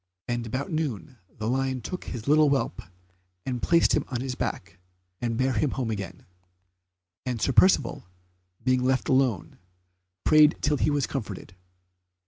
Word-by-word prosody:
And 120 -1 -2
about 130 +8 -3
noon 130 - -3
the 110 - -6
lion 130 +1 0
took 180 +8 -6
his 120 -1 -6
little 150 0 +5
whelp, 135 -9 0 0.6
and 125 -2 -3
placed 170 +5 +3
him 150 - +2
on 125 -3 -3
his 130 -1 -3
back, - - -5 0.4
and 115 -2 -1
bare 130 +1 +1
him 145 +4 +1
home 125 -3 -2
again, 100 -4 -6 1.0
and 125 -3 -3
Sir 135 - +1
Percivale, 185 - +3 0.6
being 130 0 +2
left 130 0 +1
alone, 130 -7 +1 0.6
prayed 155 0 +6
till 150 0 +1
he - - +1
was 145 -2 +1
comforted. 105 -8 -6
130 Hz, 150 wpm, -26 LUFS, 120-145 Hz, 1.0 s, prayed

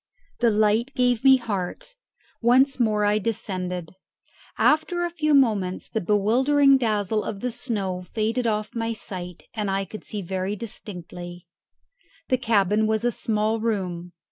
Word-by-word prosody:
The 240 - +4
light 215 +4 +2
gave 245 -2 +2
me 265 -1 +7
heart. 235 - -4 0.5
Once 260 +4 +4
more 215 -3 +2
I 210 +1 +3
descended. 185 -6 -3 0.7
After 345 +3 +2
a 345 - -3
few 305 -3 +1
moments 210 -9 +2
the 220 - -2
bewildering 260 +8 +4
dazzle 215 -2 0
of 200 -2 -5
the 250 - -1
snow 200 -7 -3
faded 225 +6 -1
off 215 -1 -1
my 230 0 -2
sight, 180 -5 -7
and 210 -3 -2
I 195 0 0
could 215 +3 -9
see 205 -2 -5
very 190 +2 -2
distinctly. 175 -5 -8 0.8
The 255 - +2
cabin 215 -2 +2
was 220 +1 0
a 240 - +3
small 220 0 0
room. 180 -6 -3
215 Hz, 145 wpm, -24 LUFS, 195-240 Hz, 0.8 s, me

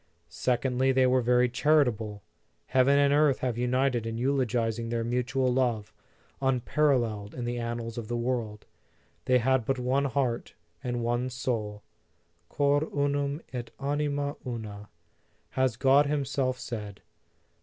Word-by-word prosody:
Secondly, 125 +9 +1
they 130 0 +4
were 130 0 +3
very 125 +1 +3
charitable. 120 -6 +1 0.5
Hea 130 - +6
ven 140 +2 +4
and 140 0 +4
earth 145 -2 +4
have 125 -3 -1
united 125 -1 0
in 115 0 -3
eulogizing 120 -3 0
their 115 0 -1
mutual 125 +2 0
love, 120 -5 0 0.5
unparalleled 125 -5 +1
in 125 - -4
the 120 0 -2
annals 115 0 -4
of 110 - -7
the 120 - -2
world. 120 -3 -2 0.6
They 130 0 +4
had 130 +1 +2
but 135 +3 -1
one 130 +3 +1
heart 130 -3 -1 0.3
and 120 -1 -2
one 120 +2 0
soul: 115 -5 -3 0.7
Cor 145 0 +2
unum 145 0 -1
et 125 -1 -4
anima 145 0 -1
una, 105 -4 -6 0.6
has 130 -3 +1
God 140 +2 +5
himself 135 -3 -1
said. 105 -6 -7
125 Hz, 135 wpm, -28 LUFS, 115-135 Hz, 0.7 s, Hea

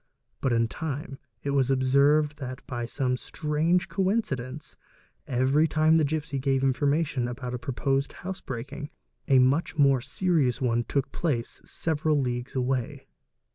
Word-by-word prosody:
But 135 - +1
in 115 -1 +2
time 145 +1 -5 0.2
it 140 - -1
was 135 -2 +2
observed 140 +3 +3
that, 130 -1 -6
by 120 -3 -4
some 125 0 -1
strange 155 +7 0
coincidence, 170 - -2 0.5
every 135 +5 +3
time 155 +1 +4
the 160 - +3
gipsy 150 -1 -2
gave 135 0 +1
information 140 0 +1
about 125 +1 -5
a 125 - -3
proposed 135 +2 -1
house 190 0 -4
breaking, 135 +4 -6 0.4
a 135 - +5
much 135 +6 +2
more 140 -3 +4
serious 160 -6 +1
one 120 -2 +1
took 140 -2 -1
place 130 -9 -2
several 155 -2 0
leagues 125 -1 -3
away. 130 -1 -1
140 Hz, 140 wpm, -27 LUFS, 130-155 Hz, 0.5 s, a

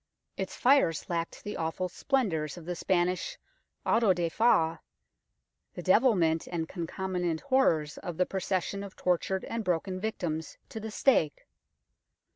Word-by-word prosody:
Its 190 -1 -4
fires 250 - +3
lacked 170 -1 -3
the 205 - -5
awful 165 +3 -2
splendours 180 - -1
of 170 - -10
the 180 +1 -3
Spanish 180 - 0 0.5
Auto 225 -4 +4
da 175 -2 -1
Fe, 165 -6 +3 1.0
the 175 - -6
devilment 185 -6 +3
and 165 -2 -3
concomitant 175 -1 -2
horrors 170 - +2
of 175 -4 -6
the 180 - +3
procession 190 +1 -2
of 200 -2 -9
tortured 185 +1 0
and 230 -1 -3
broken 185 +1 -1
victims 175 -7 -3
to 220 - -6
the 220 +1 -5
stake. 210 - +2
180 Hz, 135 wpm, -29 LUFS, 165-205 Hz, 1.0 s, Auto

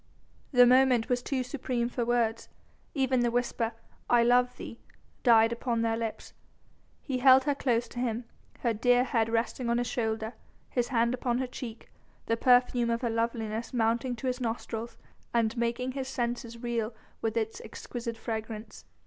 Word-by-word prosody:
The 250 -3 +7
moment 250 -2 +4
was 245 -1 +1
too 260 0 -1
supreme 250 -2 -2
for 245 0 -2
words. 230 -1 0 0.5
Even 265 -2 +2
the 240 0 +2
whisper, 235 -1 -1 0.4
"I 240 -1 +5
love 245 +1 +3
thee!" 230 - -8 0.4
died 225 -2 +5
upon 235 -1 -1
their 225 0 +1
lips. 225 -1 -5 0.7
He 260 -3 -2
held 260 0 +7
her 290 - +1
close 245 -4 0
to 245 - -7
him, 240 -1 -1 0.4
her 235 -2 +1
dear 245 +3 +3
head 230 -3 +1
resting 235 +2 -1
on 235 - +2
his 245 - 0
shoulder, 220 -1 -2 0.4
his 245 -2 0
hand 235 -1 +2
upon 245 -1 -1
her 260 - 0
cheek, 240 -2 -8 0.3
the 230 - +1
perfume 245 0 +3
of 230 0 0
her 235 -3 0
loveliness 230 0 -2
mounting 235 +2 +1
to 235 - -8
his 255 0 -1
nostrils 230 0 -4 0.4
and 225 -1 +2
making 240 +2 -1
his 265 0 -4
senses 240 -2 -3
reel 230 -2 -2 0.3
with 225 0 -1
its 220 -1 -2
exquisite 230 +1 -6
fragrance. 220 -1 -6
235 Hz, 165 wpm, -29 LUFS, 230-250 Hz, 0.7 s, The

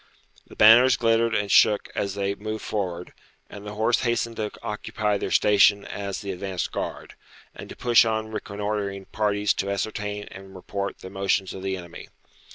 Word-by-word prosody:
The - - -14
banners 120 +4 +7
glittered 115 -1 +2
and 105 -2 -1
shook 105 -2 +4
as 100 -1 -2
they 100 0 -1
moved 110 +2 -6
forward, 90 -4 -4 0.4
and 105 0 -9
the 105 - -7
horse 110 +2 +2
hastened 120 -1 -1
to 105 -1 -2
occupy 105 0 -2
their - - -3
station 100 0 +4
as 100 -1 -5
the 100 - -4
advanced 95 0 -4
guard, - - -5 0.4
and - - -10
to - - -9
push 120 -1 +5
on 110 -1 -2
reconnoitring 100 -2 -4
parties 105 -2 +1
to 100 - -3
ascertain 105 +1 -3
and 95 0 -12
report 100 +1 -5
the 95 - -9
motions 95 -1 0
of 95 - -8
the 95 0 -2
enemy. 85 -2 -10
105 Hz, 170 wpm, -25 LUFS, 100-110 Hz, 0.4 s, banners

